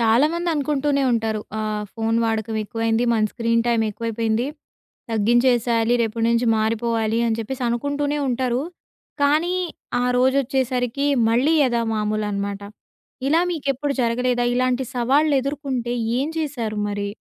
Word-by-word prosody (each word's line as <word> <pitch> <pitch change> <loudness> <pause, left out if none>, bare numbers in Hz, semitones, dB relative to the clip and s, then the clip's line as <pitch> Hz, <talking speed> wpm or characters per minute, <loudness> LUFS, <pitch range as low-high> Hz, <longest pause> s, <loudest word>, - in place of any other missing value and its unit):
చాలామంది 300 +10 +2
అనుకుంటూనే 285 -1 0
ఉంటారు. 220 -2 0 0.2
ఆహ్, 215 -1 -2
ఫోను 225 0 0
వాడకం 220 -1 -1
ఎక్కువైంది. 225 +2 0
మన 220 -2 +2
స్క్రీన్ 230 -1 +1
టైమ్ 235 -1 +2
ఎక్కువైపోయింది. 225 +2 -1 0.6
తగ్గించేసేయాలి. 235 +1 +2
రేపటి 225 0 -1
నుంచి 235 +1 +2
మారిపోవాలి, 225 0 0
అని 225 -1 0
చెప్పేసనుకుంటూనే 265 +5 -2
ఉంటారు. 250 +1 0 0.6
కానీ 310 +5 +2 0.5
ఆ - - +1
రోజొచ్చేసరికి 260 0 +1 0.2
మళ్ళీ 260 +8 +3
యథా 240 -3 +1
మామూలనమాట. 210 -2 -2 0.7
ఇలా 320 +3 +4
మీకెప్పుడు 280 -3 -1
జరగలేదా? 245 +1 +1
ఇలాంటి 255 +1 +1
సవాళ్లెదుర్కొంటే 270 -1 +1 0.3
ఏం 280 +3 0
చేశారు 240 -9 -3
మరి? 205 0 -3
240 Hz, 110 wpm, -22 LUFS, 225-270 Hz, 0.7 s, ఇలా